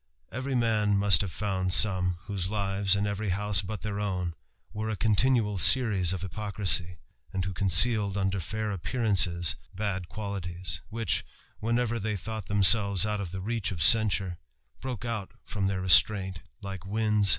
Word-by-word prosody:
Every 130 +2 -4
man 110 -4 +1
must 100 -5 +4
have 100 -3 -4
found 95 -1 -1
some 90 -4 +3
whose 95 -4 -3
lives, 100 -1 0
in 100 +1 -1
every 100 0 -3
house 100 0 +1
but 100 0 -7
their 105 -2 -4
own, 90 -4 -3 0.4
were 110 +1 -4
a 110 - -2
continual 110 0 +1
series 100 -4 +4
of 95 -1 -4
hypocrisy, 95 -3 0 0.3
and 95 -1 -3
who 95 - -4
concealed 100 +3 +2
under 95 0 -1
fair 110 +5 -4
appearances 90 -3 0 0.2
bad 95 -4 -4
qualities 90 -4 -5
which, 115 -3 -2 0.4
whenever 120 +1 -1
they 105 0 -3
thought 110 +1 -6
themselves 100 -1 +4
out 105 -1 -2
of 90 -4 -6
the 95 0 -6
ri 115 +5 -3
ot 90 - -6
censure, 95 0 +4 0.4
broke 125 -3 -6
out 105 -5 -5
from 100 -2 -3
their 95 -1 -2
restraint, 95 +1 +3 0.2
like 95 -1 -6
wtndf 95 - -12
T^M 105 - -5
RAMBLER. 105 -2 +1
100 Hz, 165 wpm, -27 LUFS, 95-110 Hz, 0.4 s, must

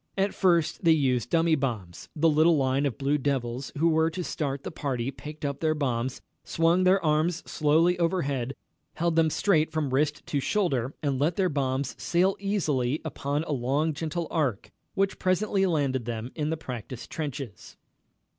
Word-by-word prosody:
At 195 +1 +1
first 170 -4 +2
they 165 -1 +6
used 130 -6 +1
dummy 165 +1 +3
bombs. 100 - -3
The 160 +2 +3
little 160 +1 +4
line 135 +1 +1
of 120 -6 -4
Blue 140 +2 +1
Devils 130 -2 -2
who 165 +3 +3
were 160 0 +3
to 180 +2 -4
start 140 -4 -3
the - - -5
party 135 -5 -2
picked 150 +2 -8
up 140 -1 -2
their 155 -1 +1
bombs, 130 -3 -2 0.2
swung 170 +3 +2
their 185 -1 +4
arms 155 +2 +1
slowly 165 +4 +2
overhead, 140 -7 0 0.4
held 170 0 0
them 165 -1 +4
straight 160 -2 +2
from 155 -4 -1
wrist 150 +2 0
to 145 - -1
shoulder, 140 - 0
and 140 -3 0
let 160 +4 +1
their 185 -1 +2
bombs 135 -2 -1
sail 185 +3 +2
easily 155 -10 0
up 155 - -7
on 145 +2 +1
a 160 - -5
long, 140 +4 0
gentle 165 +3 -3
arc, 140 - -1 0.2
which 195 0 0
presently 195 +1 +1
landed 140 -7 0
them 115 +1 -4
in 150 -1 -2
the 160 - -1
practice 125 -3 -7
trenches. 140 -8 -6
150 Hz, 175 wpm, -27 LUFS, 135-165 Hz, 0.4 s, they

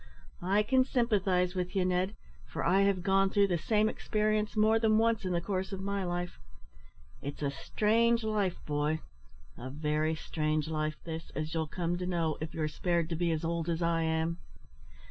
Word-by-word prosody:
"I 195 +4 +2
can 260 +4 +4
sympathise 195 -8 +1
with 180 0 -3
you, 190 -2 +2
Ned, 185 +3 0 0.3
for - - -4
I 190 +3 +4
have 195 -2 +2
gone 195 0 +3
through 200 0 +3
the 175 -2 +1
same 215 +5 +2
experience 215 -1 0
more 220 +1 +4
than 220 -1 +3
once 225 -2 +2
in 185 - -1
the 175 - +1
course 190 +1 -2
of 195 - -4
my 200 0 -2
life. 175 0 -3 0.8
It's 145 +1 -5
a 140 - +1
strange 230 +9 +2
life, 210 -4 0
boy, 150 +1 0 0.6
a 125 +2 -6
very 150 +2 0
strange 155 -1 -1
life 155 -1 -1
this, 165 0 -6
as 155 +1 -3
you'll 160 -1 -1
come 175 +2 -2
to 180 - -3
know, 165 -4 0
if 160 - -4
you're 155 -1 -1
spared 170 +1 0
to 165 - -1
be 170 +1 0
as 160 0 -1
old 170 0 -1
as 170 0 0
I 170 0 +2
am." 160 +1 0
180 Hz, 190 wpm, -31 LUFS, 160-200 Hz, 0.8 s, can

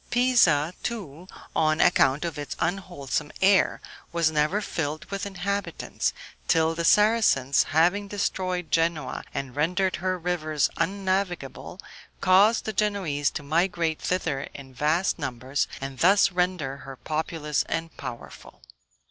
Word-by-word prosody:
Pisa, 235 - +3
too, 185 - -6 0.3
on 155 0 +2
account 150 -3 +3
of 160 -3 -4
its 145 - -5
unwholesome 175 -6 -2
air, 190 0 +4 0.3
was 170 -2 +2
never 155 +6 +1
filled 155 -6 -3
with 200 0 -3
inhabitants, 200 +1 -2 0.4
till 160 -1 +3
the 170 +1 -3
Saracens, 210 - +4
having 175 +7 +2
destroyed 185 -4 -2
Genoa 165 -4 0
and 135 -3 -5
rendered 180 +5 +1
her 185 0 -1
rivers 155 -4 0
unnavigable, 185 -4 -2 0.4
caused 195 +4 +4
the 220 - -3
Genoese 190 -8 0
to 150 - -6
migrate 165 +1 0
thither 160 -7 -1
in 135 -2 -10
vast 155 +8 +1
numbers, 130 0 -2
and 135 -1 -6
thus 195 +3 +5
render 180 -7 -1
her 135 -1 -10
populous 155 +1 -2
and 165 0 -3
powerful. 120 - -9
165 Hz, 125 wpm, -26 LUFS, 150-190 Hz, 0.4 s, thus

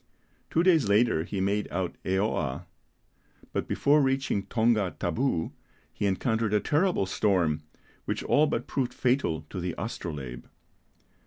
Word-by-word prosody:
Two 165 - +2
days 165 - +4
later 105 -6 +3
he 100 +2 -4
made 100 +2 0
out 90 0 -2
Eoa; 95 -8 -1 0.9
but - - -2
before 150 +2 +3
reaching 135 -7 0
Tonga 110 -5 +1
Tabou 115 -11 0 0.4
he 100 - -1
encountered 110 +2 0
a - - +4
terrible 155 - +1
storm 90 -6 +1 0.4
which - - -2
all 150 +2 +4
but 150 - -2
proved 125 -3 -2
fatal 120 - 0
to 95 - -4
the 90 -1 -3
Astrolabe. 75 - -5
105 Hz, 135 wpm, -28 LUFS, 90-130 Hz, 0.9 s, days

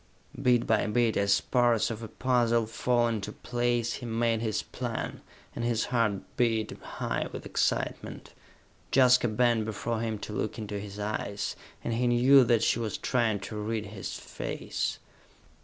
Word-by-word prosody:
Bit 125 -3 +3
by 110 -2 +2
bit, 115 +1 +2
as 100 0 +3
parts 120 -3 +2
of 115 0 -5
a 115 - -5
puzzle 120 -2 +2
fall 120 +2 +1
into 110 -4 -2
place, 120 -1 -1
he 120 - -5
made 115 0 +1
his 110 -3 -1
plan, - - -5 0.3
and - - -3
his 120 -1 +1
heart 110 -5 +1
beat 115 -3 +1
high - - -3
with - - -7
excitement. - - -2 0.6
Jaska 125 -2 +5
bent 115 0 +2
before 110 +1 -3
him 110 -2 -2
to 105 - -7
look 105 +3 -2
into 105 -2 -4
his 100 0 -8
eyes, 105 -1 -3 0.3
and 115 - -1
he 120 +2 +1
knew 130 +3 +6
that 115 -1 +3
she 120 - +2
was 110 -2 -2
trying 115 -5 0
to 95 +3 -6
read 110 0 -2
his 100 -2 -6
face. - - -4
115 Hz, 160 wpm, -29 LUFS, 110-120 Hz, 0.6 s, knew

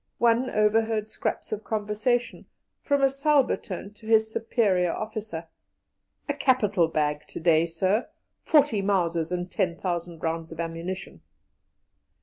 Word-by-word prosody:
One 235 +2 +3
overheard 215 0 +2
scraps - - -4
of 215 0 -3
conversation, 215 +3 -1 0.3
from 285 -1 +1
a - - +7
subaltern 275 - 0
to 220 +1 -15
his 220 -1 +4
superior 200 -6 +1
officer: 215 -6 -5 0.8
"A 290 - 0
capital 215 - +2
bag 150 -2 -1
to - - -7
day, 165 0 +3
sir. 185 +7 0 0.3
Forty 290 -9 +3
Mausers 170 -4 0
and 180 0 -3
ten 180 -3 0
thousand 170 -2 -4
rounds 165 0 -2
of 165 - -9
ammunition." 170 +3 -5
205 Hz, 130 wpm, -26 LUFS, 170-225 Hz, 0.8 s, a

